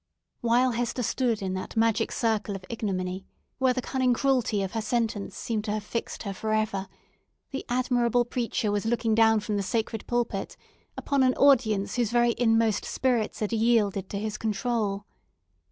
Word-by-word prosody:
While 245 +2 +3
Hester 245 +1 -2
stood 230 -3 0
in 190 -1 -2
that 185 +4 -5
magic 225 0 +2
circle 220 -3 0
of 185 -1 -8
ignominy, 190 -4 -3 0.3
where 260 -1 +4
the 255 - -2
cunning 255 -2 +1
cruelty 250 -7 +1
of 190 - -4
her 225 - -2
sentence 220 -2 -2
seemed 220 -3 -2
to 210 - -2
have 215 -1 -3
fixed 230 +2 -4
her 200 -2 -4
for 215 +3 -2
ever, 210 -3 -1 0.6
the 270 - -4
admirable 245 -1 +2
preacher 230 -3 -1
was 205 +1 -1
looking 230 -1 +1
down 225 -1 +4
from 210 0 -2
the - - 0
sacred 220 +2 -2
pulpit 235 -5 -2 0.4
upon 280 -1 0
an 255 -1 +3
audience 230 -7 +3
whose 240 -3 +1
very 240 0 +3
inmost 225 -3 +3
spirits 240 -6 -1
had 215 +1 -1
yielded 215 -4 +2
to 200 - -4
his 210 +1 -4
control. 210 -2 -1
225 Hz, 170 wpm, -27 LUFS, 205-240 Hz, 0.6 s, where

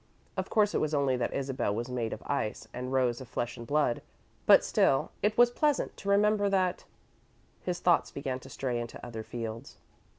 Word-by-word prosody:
Of - - -3
course 210 -2 +3
it - - +2
was 155 0 0
only 140 -2 +2
that 120 - -1
Isabel 130 -6 -1
was 120 +2 -3
made 120 -3 -2
of - - -6
ice 125 -7 -2
and 125 +1 -4
Rose 125 -2 +1
of 130 - -9
flesh 120 +1 -3
and 115 - -9
blood, 145 -4 +1 0.5
but - - +8
still, 135 - +2
it 210 +1 +1
was 240 0 +6
pleasant 295 +2 +1
to 200 - -5
remember 205 0 +3
that 185 -2 +1 0.8
His 180 -1 -3
thoughts 175 -2 +3
began 135 -2 -4
to - - -13
stray 125 -3 -2
into 120 0 -7
other 115 -2 -6
fields. 115 +2 -6
135 Hz, 195 wpm, -30 LUFS, 120-185 Hz, 0.8 s, but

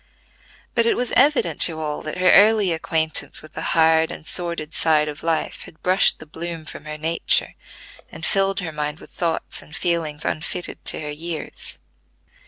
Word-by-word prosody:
But 235 -1 +3
it - - +2
was 245 0 -2
evident 255 - +3
to 160 -2 +4
all 150 -1 -3
that 155 - -5
her 185 0 +4
early 205 -1 +6
acquaintance 160 -1 +1
with 155 - -13
the 160 - -6 0.2
hard 160 0 +4
and - - -9
sordid 170 -3 -2
side 155 -2 +2
of 150 0 -6
life 165 -1 -2
had 160 - -16
brushed 185 +1 +4
the - - -11
bloom 165 +1 -6
from 150 - -8
her 155 0 -6
nature, 165 - +1 0.6
and - - -6
filled 195 -1 +2
her 170 -3 -4
mind 150 +1 -4
with - - -14
thoughts 170 -2 -1
and 150 - -10
feelings 165 -3 -1
unfitted 165 +3 -3
to - - +1
her 150 -1 -4
years. 160 +2 -5
160 Hz, 180 wpm, -22 LUFS, 155-180 Hz, 0.6 s, early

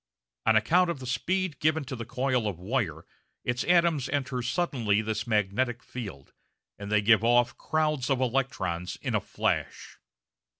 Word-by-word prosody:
On 110 - +5
account 170 +12 +4
of 170 - -2
the 130 - -9
speed 170 +6 -1
given 155 0 +2
to 130 0 -5
the 115 -1 -6
coil 130 -3 0
of 100 -5 -3
wire 90 - -2 0.4
its 120 0 -1
atoms 170 -6 +3
enter 130 -2 -1
suddenly 120 - 0
this 110 0 -3
magnetic 110 +3 0
field, 100 - -8 0.5
and 100 0 -6
they 105 -1 +3
give 110 +1 +5
off 120 +1 +3
crowds 155 -4 0
of 135 -2 +2
electrons 125 -9 -1
in - - -4
a - - +2
flash. - - -3
125 Hz, 160 wpm, -28 LUFS, 110-140 Hz, 0.5 s, On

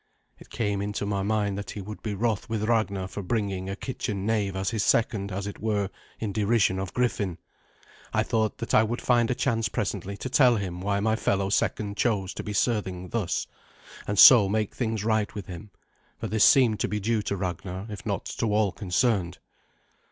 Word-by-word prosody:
It - - -15
came 105 -3 -1
into 105 0 -3
my 100 -1 -1
mind 100 -1 0
that 100 - -7
he 105 - -6
would 105 +2 -8
be 105 -2 -3
wroth 110 0 -1
with 110 -2 -2
Ragnar 110 -4 0
for 100 - -6
bringing 95 -2 -2
a 95 - -3
kitchen 100 -4 -4
knave 105 -3 0
as 95 0 -1
his 110 - -1
second, 105 -3 +1
as 100 +2 -3
it 100 - -6
were, 105 -3 -1 0.3
in 105 -3 -3
derision 105 -2 +2
of 95 -2 -4
Griffin. 105 -8 0 0.7
I - - +2
thought 110 -1 0
that 115 - -4
I - - +7
would 115 +3 -1
find 120 -2 +2
a 125 - +1
chance 115 -4 0
presently 100 -1 -3
to - - -5
tell 130 -2 +5
him 90 -4 -4
why 100 +1 0
my 110 +1 +2
fellow 100 -3 0
second 100 0 0
chose 100 -5 0
to - - -6
be 105 - -5
serving 100 -4 -1
thus, 110 -7 -1 0.6
and 105 - -2
so 105 -2 +9
make 105 0 -1
things 110 -4 -2
right 110 -2 +1
with 100 -3 -5
him, 95 +4 -9 0.5
for - - -6
this 110 0 +3
seemed 120 -6 +5
to - - 0
be 105 - -2
due 110 +2 0
to 100 -1 -3
Ragnar, 90 +1 -4
if 105 -2 -8
not - - -3
to 115 - -2
all 105 -2 +2
concerned. 95 -2 0
105 Hz, 205 wpm, -26 LUFS, 100-110 Hz, 0.7 s, so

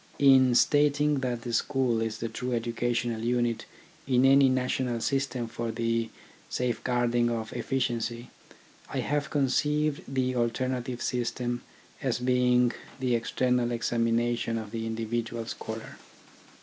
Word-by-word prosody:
In 130 -3 +6
stating 145 +1 +3
that 125 -3 -2
the 120 - -4
school 120 -1 +1
is 115 -1 -2
the 115 - -3
true 120 +1 -2
educa 120 +1 -2
tional 120 -2 -1
unit 120 -1 0 0.4
in 130 -1 +4
any 135 0 +6
national 125 -1 0
system 125 0 -1
for 115 0 -4
the 115 0 -1 0.4
safe 125 -3 -1
guarding 120 -1 +2
of 115 -2 -3
efficiency, 120 -2 -2 0.6
I - - -2
have 145 -1 -1
conceived 150 +2 +1
the 130 -1 -1
alternative 125 +1 -1
system 120 0 -2 0.4
as 130 -5 0
being 125 0 +3 0.3
the 125 -1 0
external 125 +1 +1
examina 120 0 +1
tion 115 0 -2
of 110 -2 -6
the 115 -1 -3
individual 115 +1 -3
scholar. 110 0 -7
120 Hz, 135 wpm, -28 LUFS, 115-130 Hz, 0.6 s, In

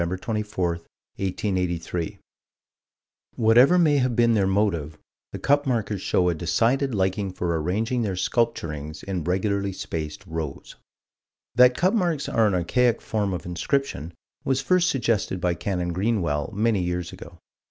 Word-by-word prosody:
24, 95 +2 -2 0.5
1883): 90 -3 -2 1.2
"Whatever 120 +9 +5
may 155 -5 +4
have 125 -3 +1
been 115 0 +4
their 100 -3 +2
motive, 90 -7 0 0.3
the - - -5
cup 145 +1 +2
markers 110 -6 -1
showed 90 -1 +2
a - - +1
decided 115 - +1
liking 95 0 0
for 85 -3 -1
arranging 110 +9 -1
their 100 -5 -1
sculpturings 85 -8 -2
in 95 -4 -3
regularly 100 +3 0
spaced 80 0 -5
rows." 80 -4 -6 0.8
That 125 +1 +6
cup 185 +4 +2
marks 175 -9 0
are 115 -1 +3
an 100 - +1
archaic 120 +7 +2
form 105 -3 -2
of 90 - -4
inscription 90 - -2 0.3
was 135 -1 +1
first 180 +5 +2
suggested 115 -7 0
by 90 0 +1
Canon 90 0 -2
Greenwell 90 -8 0
many 110 -1 +1
years 90 -1 -3
ago. 85 +1 -11
100 Hz, 140 wpm, -24 LUFS, 90-120 Hz, 1.2 s, That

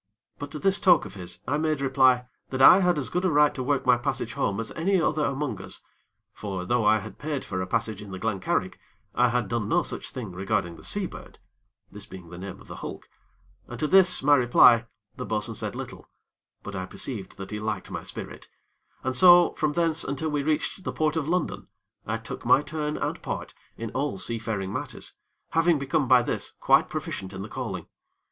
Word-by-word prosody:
But 145 - -6
to 150 - -7
this 195 +5 +2
talk 175 - +5
of 100 - -9
his, 90 -2 -6
I 145 - 0
made 155 -2 0
reply 130 -2 +3 0.2
that 130 - -4
I 155 +7 +9
had 180 -3 +2
as 140 - -1
good 180 - -1
a 185 - +3
right 150 -1 +4
to 130 - -5
work 140 +1 0
my 125 -1 +5
passage 120 -3 -2
home 100 -2 -1
as 115 - -4
any 190 +3 +1
other 155 -1 +1
among 140 -6 -2
us; - - -6 0.5
for 95 -3 -5
though 120 +2 +1
I 105 +1 +5
had 105 - -9
paid 145 -1 -3
for 95 -2 -3
a 95 - -3
passage 105 +2 -1
in 105 - -10
the 95 - -6
Glen 105 0 -2
Carrig, 95 - -1 0.3
I 125 0 +3
had 120 -3 0
done 105 0 -2
no - - +3
such - - -6
thing 115 -7 -6
regarding 95 -1 -2
the - - -14
Seabird 200 -3 -3 0.5
this 105 0 -10
being 90 -3 -11
the 85 - -9
name 95 0 -7
of - - -15
the - - -9
hulk - - -8 0.6
and - - -8
to - - 0
this, 185 -1 +5
my 145 +1 +5
reply, 120 -2 +6 0.3
the - - -4
bo'sun 110 +1 -2
said - - -5
little; - - -8 0.5
but 100 - -7
I 95 -1 -4
perceived 105 -2 -6
that 95 +1 -8
he 105 - -3
liked 105 0 -4
my - - -4
spirit, - - -8 0.6
and 130 0 -1
so 175 +4 +7
from 150 -1 -1
thence 165 -1 +1
until 140 +3 -2
we 145 -1 0
reached 155 +5 -1
the - - -3
Port 155 0 0
of 155 -3 -1
London, 155 - -1 0.4
I 110 +1 -1
took 115 0 -8
my 125 +4 +5
turn 150 0 -3
and - - -3
part - - -5 0.2
in 115 -1 -5
all 135 -4 -2
seafaring 110 -3 -3
matters, - - -6 0.4
having 165 0 +3
become 140 0 0
by 125 -1 +6
this - - -3
quite - - +4
proficient 95 0 -5
in 95 0 -6
the - - -6
calling. 110 -10 -5
125 Hz, 215 wpm, -26 LUFS, 105-150 Hz, 0.6 s, I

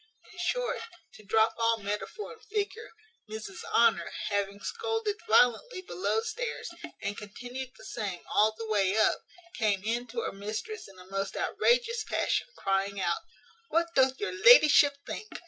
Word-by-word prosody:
In 360 - -12
short, - - -1 0.3
to 215 - -14
drop 220 +2 +3
all 230 0 +3
metaphor 210 - -5
and 450 - -18
figure, 425 +1 -3 0.4
Mrs 215 -3 -7
Honour, 230 -1 +4 0.2
having 200 -1 -1
scolded 450 - -2
violently 245 - +3
below 205 - -1
stairs, 455 - -4 0.3
and 205 - -2
continued 245 +6 -7
the - - -13
same 205 -7 -4
all 215 +1 +4
the 225 - -5
way 205 -2 +2
up, 220 - +3 0.4
came 205 -4 +1
in 235 +3 -1
to 235 0 -3
her - - -3
mistress 215 - -5
in 195 -1 -16
a 180 - -13
most 195 +1 -3
outrageous 475 -1 +2
passion, - - 0
crying 195 +1 0
out, 175 - 0 0.5
"What 335 +1 +1
doth 265 -2 +3
your 415 - -2
ladyship 310 -10 +7
think? 430 - -6
230 Hz, 155 wpm, -29 LUFS, -, 0.5 s, ladyship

